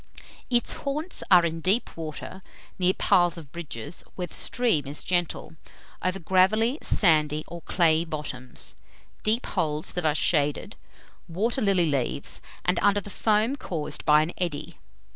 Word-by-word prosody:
Its 240 Hz, -1 st, +1 dB
haunts 300 Hz, +5 st, -4 dB
are 180 Hz, -2 st, +7 dB
in 165 Hz, 0 st, -2 dB
deep 195 Hz, +8 st, +1 dB
water, 165 Hz, +4 st, -7 dB, 0.4 s
near 185 Hz, +1 st, +3 dB
piles 175 Hz, -1 st, +3 dB
of 150 Hz, -5 st, -11 dB
bridges, 155 Hz, -3 st, -6 dB
where 180 Hz, -, -3 dB
the 175 Hz, -, -14 dB
stream 225 Hz, -, +1 dB
is 145 Hz, +2 st, -3 dB
gentle, 175 Hz, -2 st, -2 dB, 0.5 s
over 185 Hz, +1 st, -1 dB
gravelly, 195 Hz, -, +2 dB
sandy, 155 Hz, -4 st, +3 dB
or 170 Hz, 0 st, -8 dB
clayey 165 Hz, -2 st, +2 dB
bottoms; 150 Hz, -6 st, -5 dB, 0.5 s
deep 225 Hz, +3 st, +1 dB
holes 150 Hz, -1 st, -2 dB
that 180 Hz, -, -2 dB
are 155 Hz, -2 st, +2 dB
shaded, 145 Hz, -2 st, +1 dB, 0.5 s
water 220 Hz, +10 st, -1 dB
lily 195 Hz, -4 st, +3 dB
leaves, 140 Hz, -5 st, -1 dB, 0.2 s
and 180 Hz, -1 st, +2 dB
under 205 Hz, 0 st, +3 dB
the 205 Hz, 0 st, -9 dB
foam 215 Hz, +6 st, +1 dB
caused 165 Hz, -, -3 dB
by 150 Hz, 0 st, +5 dB
an 165 Hz, -, -5 dB
eddy. 170 Hz, -5 st, -4 dB
175 Hz, 145 wpm, -26 LUFS, 155-200 Hz, 0.5 s, are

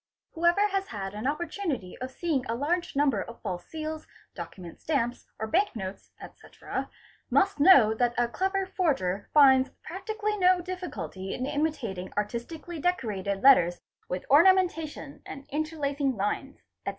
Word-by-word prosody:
| -, -, -63 dB
Whoever 345 Hz, +5 st, +3 dB
has 390 Hz, 0 st, -1 dB
had 195 Hz, -3 st, -5 dB
an 215 Hz, +5 st, -3 dB
opportunity 305 Hz, -, -3 dB
of 255 Hz, -, -4 dB
seeing 285 Hz, -1 st, -1 dB
a 230 Hz, -, -1 dB
large 340 Hz, +7 st, -1 dB
number 275 Hz, -7 st, +2 dB
of 235 Hz, -, -9 dB
false 175 Hz, -1 st, -4 dB
seals, 315 Hz, 0 st, -5 dB, 0.3 s
document 170 Hz, 0 st, -9 dB
stamps, 245 Hz, -6 st, -1 dB
or 220 Hz, -, -3 dB
bank 365 Hz, -, +1 dB
notes, 190 Hz, -2 st, -6 dB
etc., -, -, -7 dB, 0.4 s
must 390 Hz, -6 st, +2 dB
know 275 Hz, -, +7 dB
that 240 Hz, +1 st, 0 dB
a 240 Hz, 0 st, +3 dB
clever 385 Hz, +9 st, -1 dB
forger 235 Hz, -, -1 dB
finds 265 Hz, -3 st, +6 dB
practically 420 Hz, +4 st, -3 dB
no 365 Hz, 0 st, +5 dB
difficulty 355 Hz, -, -5 dB
in 255 Hz, -, -3 dB
imitating 275 Hz, -, -2 dB
artistically 295 Hz, +11 st, -4 dB
decorated 205 Hz, -, -1 dB
letters 175 Hz, -11 st, +6 dB, 0.3 s
with 180 Hz, -, -3 dB
ornamentation 325 Hz, -3 st, +3 dB
and 275 Hz, 0 st, -9 dB
interlacing 285 Hz, -3 st, -1 dB
lines, 210 Hz, +7 st, -3 dB, 0.2 s
etc. -, -, -2 dB
280 Hz, 145 wpm, -28 LUFS, 220-345 Hz, 0.4 s, know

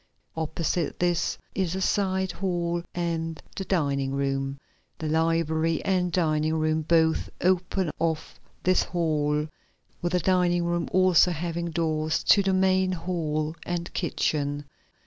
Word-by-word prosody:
Opposite 160 Hz, +1 st, -1 dB
this 175 Hz, -1 st, 0 dB, 0.2 s
is 185 Hz, -2 st, -1 dB
a -, -, -2 dB
side 190 Hz, -1 st, +1 dB
hall 175 Hz, -2 st, -1 dB
and 165 Hz, -2 st, -2 dB, 0.2 s
the 195 Hz, -, -3 dB
dining 140 Hz, -7 st, 0 dB
room. 135 Hz, 0 st, -1 dB, 0.4 s
The 160 Hz, -, -4 dB
library 160 Hz, 0 st, +1 dB
and 180 Hz, -2 st, +1 dB
dining 155 Hz, -2 st, +1 dB
room 155 Hz, 0 st, +1 dB
both 160 Hz, 0 st, +2 dB
open 185 Hz, -1 st, +1 dB
off 160 Hz, -1 st, -2 dB, 0.2 s
this 185 Hz, 0 st, +4 dB
hall 150 Hz, -3 st, 0 dB, 0.5 s
with 175 Hz, 0 st, -1 dB
the 180 Hz, -, +3 dB
dining 175 Hz, -1 st, +2 dB
room 170 Hz, 0 st, -1 dB
also 185 Hz, -2 st, +5 dB
having 170 Hz, 0 st, -3 dB
doors 155 Hz, -1 st, 0 dB
to 200 Hz, -, +6 dB
the 195 Hz, -1 st, +1 dB
main 185 Hz, 0 st, +3 dB
hall 160 Hz, -3 st, -2 dB
and 175 Hz, 0 st, -4 dB
kitchen. 145 Hz, -4 st, -1 dB
170 Hz, 130 wpm, -26 LUFS, 155-180 Hz, 0.5 s, to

